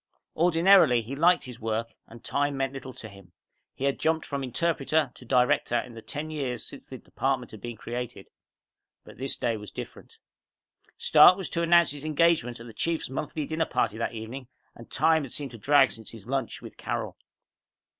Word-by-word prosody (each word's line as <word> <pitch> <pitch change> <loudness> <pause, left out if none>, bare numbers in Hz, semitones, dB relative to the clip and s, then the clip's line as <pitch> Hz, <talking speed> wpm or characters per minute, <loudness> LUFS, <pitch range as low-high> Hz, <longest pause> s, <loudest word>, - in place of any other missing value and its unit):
Ordinarily, 165 -6 +5
he 125 +5 -6
liked 175 +5 +4
his 125 -2 -9
work 115 +1 -2
and 115 +1 -14
time 145 0 -1
meant 135 0 -1
little 135 -1 -7
to 110 - -9
him. 100 -4 -16 0.4
He - - -7
had 140 0 +1
jumped 160 0 +1
from 140 -1 -3
interpreter 155 +1 0
to 125 - -15
director 125 -1 +2
in 120 0 -7
the 115 - -9
ten 150 +6 -6
years 130 -6 -3
since - - -11
the - - -8
department - - -2
had - - -11
been 120 -2 -6
created. 120 -3 -6 0.8
But - - -15
this 135 +1 -2
day 115 -2 -1
was 105 -1 -9
different. - - -10 0.8
Stark 180 - +7
was 190 - -5
to 170 - 0
announce 170 -1 +5
his 145 0 -8
engagement 155 -6 +2
at 115 - -10
the 115 - -11
Chief's 165 -2 -2
monthly 150 +2 -3
dinner 160 +2 -1
party 110 +2 -1
that 115 - -2
evening 115 +4 -7 0.3
and 115 - -14
time 160 +3 +3
had 135 -4 -7
seemed 140 -3 -5
to 115 - -11
drag 135 +3 +5
since 110 -1 -10
his 110 -4 -12
lunch 135 -1 -3
with - - -11
Carol. - - -4
135 Hz, 195 wpm, -27 LUFS, 115-155 Hz, 0.8 s, Stark